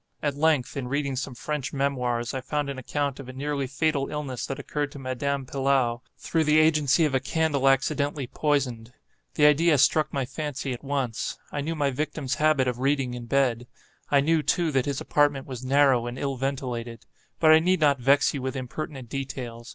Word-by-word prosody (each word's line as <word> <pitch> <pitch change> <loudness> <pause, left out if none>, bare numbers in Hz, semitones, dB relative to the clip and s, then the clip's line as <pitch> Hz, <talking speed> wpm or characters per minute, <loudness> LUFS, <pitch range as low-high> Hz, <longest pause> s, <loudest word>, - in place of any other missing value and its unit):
At 145 -1 +1
length, 150 -3 +1
in 135 -3 -3
reading 140 0 -1
some 130 0 -4
French 150 +1 -4
memoirs, 125 -4 -1
I 130 - -3
found 145 +1 -2
an 135 - -6
account 140 +2 -2
of 135 -2 -9
a - - -7
nearly 140 0 -2
fatal 140 +1 0
illness 145 -4 -4
that 135 - -4
occurred 145 +1 -3
to - - -9
Madame 135 +1 -2
Pilau, 130 -3 +1 0.2
through 160 -1 0
the 150 +1 +4
agency 155 -1 +4
of 150 - -1
a 130 - +3
candle 140 -1 +1
accidentally 140 +1 0
poisoned. 125 -4 -1 0.4
The 150 - +4
idea 150 +1 +5
struck 150 +3 +3
my 135 -2 -1
fancy 135 -1 -4
at 120 - -9
once. 135 -5 -2
I 145 - -2
knew 160 +3 -3
my 145 -3 +1
victim's 140 -1 -3
habit 155 -4 +3
of 125 -1 -2
reading 135 -2 0
in 120 -1 -7
bed. 125 -3 +1 0.4
I 140 -1 +4
knew, 160 +2 +2
too, 165 +1 +1
that 135 -2 +1
his 140 -1 -2
apartment 145 -2 +1
was 130 -2 -7
narrow 130 -2 +3
and 120 +1 -5
ill 140 0 -2
ventilated. 125 -3 -4 0.3
But 160 -1 +6
I 155 - +8
need 180 +2 +2
not 145 -3 +3
vex 140 +3 +3
you 140 - -4
with 130 +1 -3
impertinent 130 0 -6
details. 125 -3 -6
140 Hz, 200 wpm, -26 LUFS, 130-145 Hz, 0.4 s, I